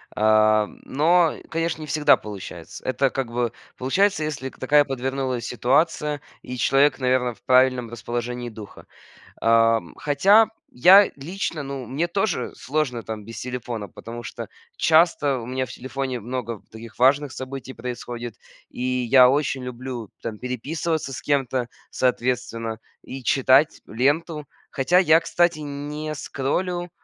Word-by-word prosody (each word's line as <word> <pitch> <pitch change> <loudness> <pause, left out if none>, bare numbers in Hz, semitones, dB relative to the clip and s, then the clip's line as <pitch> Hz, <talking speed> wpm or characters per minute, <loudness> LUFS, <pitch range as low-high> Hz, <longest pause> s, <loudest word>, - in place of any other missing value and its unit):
Э, 110 0 +4 0.2
но, 165 +4 +3
конечно, 165 0 -2
не 155 - -7
всегда 150 0 +4
получается. 95 -5 -9
Это 130 +1 +1
как 130 -3 -4
бы 120 -1 -1 0.2
получается, 160 +6 +1
если 145 -3 -4
такая 145 +3 +3
подвернулась 130 -2 -3
ситуация, 145 +3 +1 0.2
и 125 - -7
человек, 135 +4 +3
наверно, 125 -1 +1
в - - -25
правильном 130 -2 +3
расположении 120 +1 -4
духа. 110 -2 -11 0.6
Э, - - -5
м, 115 -5 +3
хотя, 195 +10 +4 0.3
я 190 +10 +7
лично, 165 +1 -4
ну, 135 -2 -6
мне 145 +9 -1
тоже 175 - -1
сложно 130 -5 -2
там 110 -2 -6
без 115 0 -8
телефона, 120 -4 -5
потому 115 +6 -9
что - - -7 0.3
часто 155 -4 +3
у 115 - -7
меня 130 +1 -2
в - - -15
телефоне 130 0 -4
много 120 -1 -5
таких 110 0 -11
важных 135 +2 +3
событий 130 0 -7
происходит, 120 -1 -6 0.3
и - - -9
я 125 0 +5
очень 140 -1 0
люблю 125 -3 -6
там 110 -2 -5
переписываться 145 +4 -3
с - - -6
кем-то, 130 -4 0 0.2
соответственно, 120 -3 -1 0.2
и 135 +1 -8
читать 135 +4 +3
ленту. 145 +6 0 0.2
Хотя 140 +7 +2
я, 165 -3 +6
кстати, 170 -1 +1
не 150 +1 -5
скроллю 175 +7 -2
130 Hz, 140 wpm, -23 LUFS, 120-150 Hz, 0.6 s, я